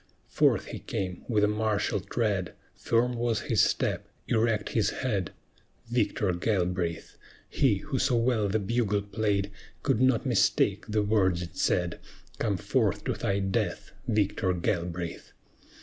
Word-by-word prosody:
Forth -, -, +3 dB
he -, -, -7 dB
came, 90 Hz, -2 st, -4 dB
with 105 Hz, -3 st, +2 dB
a -, -, +5 dB
martial 105 Hz, 0 st, 0 dB
tread; 100 Hz, -2 st, -1 dB, 0.2 s
Firm 120 Hz, +2 st, +1 dB
was 120 Hz, -2 st, 0 dB
his -, -, +2 dB
step, -, -, 0 dB, 0.2 s
erect 115 Hz, -1 st, +1 dB
his 110 Hz, -, +1 dB
head; 100 Hz, -9 st, -2 dB, 0.6 s
Victor 105 Hz, -5 st, +1 dB
Galbraith, 90 Hz, -3 st, -1 dB, 0.3 s
He 130 Hz, -7 st, +2 dB
who 135 Hz, -4 st, -1 dB
so 125 Hz, -, +2 dB
well 115 Hz, -3 st, +2 dB
the 100 Hz, +2 st, +1 dB
bugle 105 Hz, -1 st, 0 dB
played, 100 Hz, -1 st, -1 dB, 0.3 s
Could 110 Hz, -, +2 dB
not 130 Hz, -3 st, +3 dB
mistake -, -, +2 dB
the 105 Hz, 0 st, +1 dB
words 95 Hz, -4 st, +2 dB
it 85 Hz, -, -9 dB
said: 90 Hz, -1 st, 0 dB, 0.4 s
"Come -, -, 0 dB
forth -, -, 0 dB
to -, -, -1 dB
thy 100 Hz, -, -1 dB
death, 95 Hz, 0 st, -2 dB, 0.2 s
Victor 105 Hz, -3 st, +1 dB
Galbraith!" 85 Hz, -1 st, -3 dB
105 Hz, 140 wpm, -28 LUFS, 95-115 Hz, 0.6 s, a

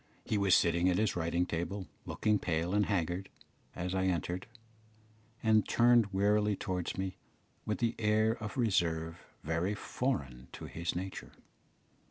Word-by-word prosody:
He -, -, -1 dB
was 100 Hz, -2 st, +4 dB
sitting 85 Hz, +1 st, +3 dB
at 90 Hz, -, +2 dB
his 110 Hz, -2 st, +1 dB
writing 85 Hz, +1 st, 0 dB
table 90 Hz, +3 st, -3 dB, 0.2 s
looking 105 Hz, -1 st, +1 dB
pale 85 Hz, +1 st, -1 dB
and 105 Hz, 0 st, +3 dB
haggard, 90 Hz, -1 st, -1 dB, 0.5 s
as 90 Hz, +1 st, -3 dB
I 95 Hz, 0 st, +1 dB
entered, 90 Hz, 0 st, -1 dB, 1.0 s
and 110 Hz, -1 st, +4 dB
turned 120 Hz, -3 st, +5 dB
wearily 105 Hz, +1 st, +2 dB
towards 95 Hz, -3 st, -3 dB
me 95 Hz, -1 st, -3 dB, 0.5 s
with 105 Hz, +3 st, -1 dB
an 115 Hz, 0 st, +2 dB
air 110 Hz, 0 st, +3 dB
of 105 Hz, +4 st, -5 dB
reserve 85 Hz, -7 st, +1 dB, 0.2 s
very 80 Hz, +6 st, 0 dB
foreign 70 Hz, -, -3 dB
to -, -, -7 dB
his 85 Hz, +1 st, -3 dB
nature. 95 Hz, +1 st, -5 dB
95 Hz, 145 wpm, -32 LUFS, 85-105 Hz, 1.0 s, turned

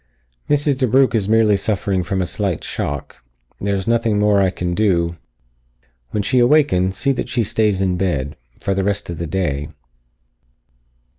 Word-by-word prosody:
"Mrs. 145 Hz, -1 st, +2 dB
DeBrugh 130 Hz, +1 st, +3 dB
is 105 Hz, -3 st, 0 dB
merely 110 Hz, -2 st, +4 dB
suffering 100 Hz, -1 st, -1 dB
from 95 Hz, +2 st, -1 dB
a -, -, -2 dB
slight 95 Hz, -2 st, -2 dB
shock. 70 Hz, -3 st, -5 dB, 0.4 s
There 100 Hz, 0 st, -1 dB
is 95 Hz, -, -3 dB
nothing 115 Hz, -2 st, +1 dB
more 105 Hz, -1 st, +3 dB
that 95 Hz, -, +4 dB
I -, -, +2 dB
can 90 Hz, -1 st, -3 dB
do. 85 Hz, -4 st, +1 dB, 0.9 s
When 105 Hz, -, -2 dB
she 130 Hz, +4 st, +2 dB
awakens, 120 Hz, -9 st, +3 dB
see 140 Hz, -, +1 dB
that 125 Hz, -2 st, -3 dB
she 120 Hz, -1 st, +1 dB
stays 105 Hz, -2 st, +1 dB
in 90 Hz, -1 st, 0 dB
bed. 75 Hz, -7 st, -1 dB, 0.2 s
For 100 Hz, -, -1 dB
the 95 Hz, 0 st, -1 dB
rest 100 Hz, -2 st, -2 dB
of 85 Hz, -, -7 dB
the 85 Hz, -, -3 dB
day." 75 Hz, -4 st, -2 dB
100 Hz, 170 wpm, -19 LUFS, 90-115 Hz, 0.9 s, merely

